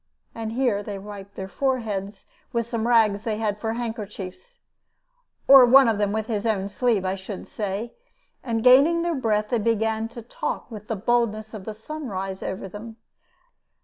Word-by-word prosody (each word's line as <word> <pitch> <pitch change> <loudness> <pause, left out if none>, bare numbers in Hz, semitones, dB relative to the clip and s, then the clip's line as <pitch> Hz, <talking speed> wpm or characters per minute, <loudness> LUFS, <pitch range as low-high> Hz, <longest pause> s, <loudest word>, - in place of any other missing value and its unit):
And 225 -1 -5
here 240 -5 +1
they 205 -1 -6
wiped 200 0 -10
their 190 - -5
foreheads 210 -5 -2 0.3
with 235 -2 0
some 230 0 -2
rags 220 -4 +4
they 220 -2 -2
had 210 -2 -1
for 225 0 -2
handkerchiefs, 225 - -6 0.9
or 270 -1 +10
one 260 +1 +7
of 220 -2 +1
them 205 -1 +1
with 220 0 -1
his 215 -3 -2
own 200 -3 0
sleeve, 215 -2 +1
I 185 - 0
should 195 0 -7
say, 210 +3 -4 0.5
and, 225 -3 -1
gaining 285 +7 +6
their 345 0 0
breath, 215 -6 0
they 240 - +1
began 225 0 0
to 235 0 -10
talk 240 - -4
with 210 -1 -9
the 225 - -2
boldness 220 0 0
of 205 -4 -8
the 220 - -5
sunrise 210 -7 -5
over 190 +1 -4
them. 220 +4 -9
220 Hz, 175 wpm, -24 LUFS, 205-235 Hz, 0.9 s, or